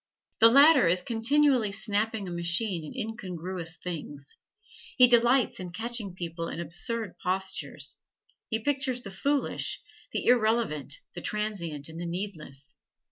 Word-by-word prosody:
The 230 - +8
latter 280 - +7
is 180 +2 +2
continually 245 0 +2
snapping 210 0 0
a - - -5
machine 170 +1 0
at - - -11
incongruous 185 -5 -3
things; 145 -5 -7 0.6
he 250 - +9
delights 240 +1 +3
in 180 -1 -6
catching 220 0 -4
people 165 -2 -5
in - - -6
absurd 180 +6 -4
postures; 155 -7 -3 0.5
he 225 - +1
pictures 265 -3 0
the 195 - -7
foolish, 280 +9 -1 0.3
the - - -3
irrelevant, 220 - +1
the 175 - -7
transient 175 -10 -3
and 165 +1 -8
the 175 - -4
needless. 170 -7 -7
195 Hz, 135 wpm, -28 LUFS, 170-230 Hz, 0.6 s, he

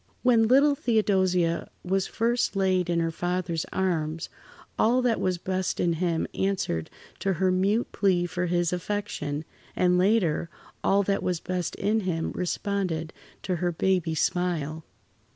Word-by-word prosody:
When 230 -3 +5
little 280 +4 +5
Theodosia 190 -9 +1 0.2
was 190 +1 0
first 235 -1 0
laid 185 -2 +1
in 170 -1 +2
her 165 0 0
father's 175 -1 -2
arms, 165 -4 -1 0.5
all 245 +3 +3
that 235 -3 +2
was 185 -1 +1
best 185 +1 -2
in 170 -1 +2
him 165 -1 0
answered 185 - -1 0.3
to 195 - 0
her 185 +2 +1
mute 200 +6 +1
plea 185 -3 +2
for 175 +1 -2
his 175 0 +1
affection, 175 -6 -3 0.3
and 180 0 +3
later, 180 -5 +2 0.3
all 200 +1 +3
that 200 0 0
was 180 -2 -1
best 180 -1 -3
in 215 +2 +1
him 175 -5 -2
responded 180 -3 -2 0.3
to 180 -2 -1
her 175 +1 0
baby 175 -1 0
smile. 160 -2 -1
180 Hz, 145 wpm, -26 LUFS, 170-200 Hz, 0.5 s, When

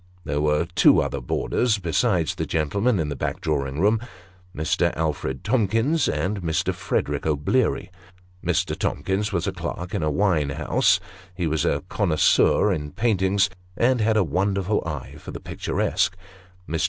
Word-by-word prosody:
There 75 -1 -1
were 75 +2 +2
two - - +6
other - - -2
boarders, 120 -3 0
besides 85 -5 +1
the - - -4
gentleman 100 +8 +1
in 75 -2 -1
the 75 - -3
back - - -3
drawing 70 -2 -2
room 105 +5 +3 0.6
Mr. 80 - +1
Alfred 75 -4 -2
Tomkins 115 - +1
and 95 +7 -1
Mr. 80 -2 0
Frederick - - -2
O'Bleary. 80 - 0 0.5
Mr. - - 0
Tomkins 100 +3 -1
was 90 -2 -1
a 100 - 0
clerk 90 0 -5
in - - -1
a 75 - +1
wine 80 -3 +1
house; 75 +2 +2 0.4
he 90 - -2
was 80 -2 0
a 70 - 0
connoisseur 95 +2 +3
in 75 -4 -5
paintings, 100 -3 +2 0.3
and 125 0 +2
had 110 0 +2
a 105 - +4
wonderful 95 +5 0
eye 75 -5 -6
for - - -11
the - - -6
picturesque. 95 0 -1 0.5
Mr. 80 +1 -2
90 Hz, 155 wpm, -24 LUFS, 75-105 Hz, 0.6 s, two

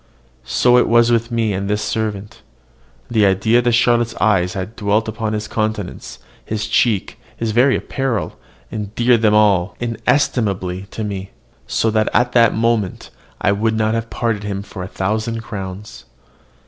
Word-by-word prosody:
So 125 0 +4
was 120 +1 +4
it - - +4
with 115 0 +1
me 115 -3 0
and 100 +1 -3
this 105 +1 0
servant. 105 -2 -3 0.7
The 110 -3 +3
idea 110 +5 +3
that 120 0 +1
Charlotte's 120 -1 +2
eyes 90 -4 +2
had 95 +4 -5
dwelt 105 +1 0
on 110 -1 -1
his 105 0 -3
countenance, 105 - -3 0.3
his 110 0 -3
cheek, 110 -1 0 0.2
his 115 -1 -2
very 125 +5 +4
apparel, 135 -6 -2 0.4
endeared 110 +3 +1
them 105 -2 +4
all 100 -4 +3
inestimably 105 -6 -1
to 110 - -5
me, 100 -2 -5 0.4
so 110 - +1
that 110 0 +1
at 125 0 +3
the 115 -2 +5
moment 110 -4 -1 0.3
I 100 - +3
would 110 +2 0
not 110 0 +1
have 115 0 -2
parted 115 -3 -1
from 105 - -6
him 100 0 -3
for 100 -2 -9
a 90 - -5
thousand 110 +4 -2
crowns. 100 -2 -8
110 Hz, 160 wpm, -19 LUFS, 100-115 Hz, 0.7 s, the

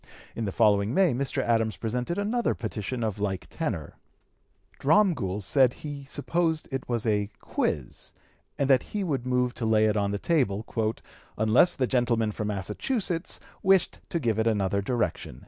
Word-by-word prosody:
In 115 - -2
the 100 - -2
following 105 +1 +3
May 190 -7 +4
Mr. 135 +2 -1
Adams 115 -2 +1
presented 125 - -2
another 220 +4 0
petition 115 +2 -4
of 105 -2 -2
like 95 -2 -2
tenor. 110 - -4 0.8
Dromgoole 140 - +2
said 130 +6 +4
that - - -14
he 145 -2 -6
supposed 160 +3 -1
it 135 -1 -4
was 120 -2 -1
a 105 -2 +1
"quiz," 70 -5 -3 0.5
and 140 - +1
that 135 -2 +5 0.2
he 205 - 0
would 135 -8 -2
move 125 -1 +1
to 115 - -4
lay 110 -1 +4
it 105 0 +2
on 100 -1 +1
the 100 - -1
table, 110 -7 0 0.7
"unless 110 +11 +5
the 130 - +1
gentleman 120 -3 +1
from 105 0 -4
Massachusetts 165 - -2 0.2
wished 190 -2 +3
to 170 - -1
give 115 -6 0
it 110 - +2
another 100 -2 +1
direction." 95 - -2
120 Hz, 165 wpm, -27 LUFS, 105-145 Hz, 0.8 s, that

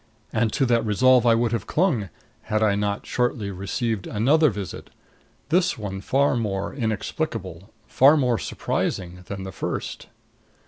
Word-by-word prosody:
And 110 -1 +1
to 135 - +2
that 120 -2 +2
resolve 125 +3 +4
I 115 - +6
would 115 0 +1
have 115 - -2
clung 150 - +1 0.4
had 110 0 +1
I 105 -2 +3
not 100 0 -2
shortly 120 -5 -1
received 100 +3 -3
another 145 +9 +3
visit 100 -3 -7 0.6
this 180 +3 +2
one 95 -3 -5
far 140 +3 +2
more 100 -5 -2
inexplicable, 110 - -3 0.2
far 140 +4 +5
more 125 -6 +1
surprising, 90 +1 -3
than 95 -1 -5
the 95 - -6
first. - - -5
110 Hz, 145 wpm, -24 LUFS, 100-130 Hz, 0.6 s, I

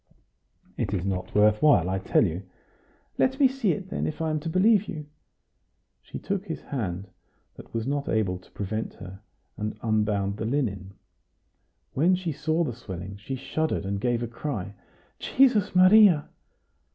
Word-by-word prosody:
"It 105 - -1
is 90 -1 -2
not 95 -2 -3
worth 105 +1 +4
while, 145 - +5
I 95 +1 -1
tell 95 - +2
you." 85 0 -3 0.8
"Let 265 +2 +2
me 275 - +7
see 255 -7 0
it 190 -2 -7
then, - - -1
if 155 - -5
I 160 -1 -1
am 155 - 0
to 165 +2 -5
believe 205 +4 +3
you." 155 -6 -6 1.0
She - - -8
took 195 -1 -3
his 160 - -4
hand, 100 -8 -4 0.5
that - - -14
was 115 -1 -3
not 140 +1 -2
able 95 -5 0
to 90 - -22
prevent 110 +2 -4
her, 95 0 -10 0.4
and 105 0 -4
unbound 105 -3 0
the 110 - -3
linen. 100 -7 -2 1.0
When 170 +7 +3
she 180 -2 -3
saw 155 +4 0
the 130 -7 -3
swelling, 95 -4 -8
she 110 +7 -5
shuddered, 155 -3 -2
and 100 0 -2
gave 120 0 0
a - - -2
cry: 115 -5 -5 0.5
"Jesus 250 -9 +3
Maria!" 185 -3 +6
120 Hz, 165 wpm, -26 LUFS, 100-165 Hz, 1.0 s, me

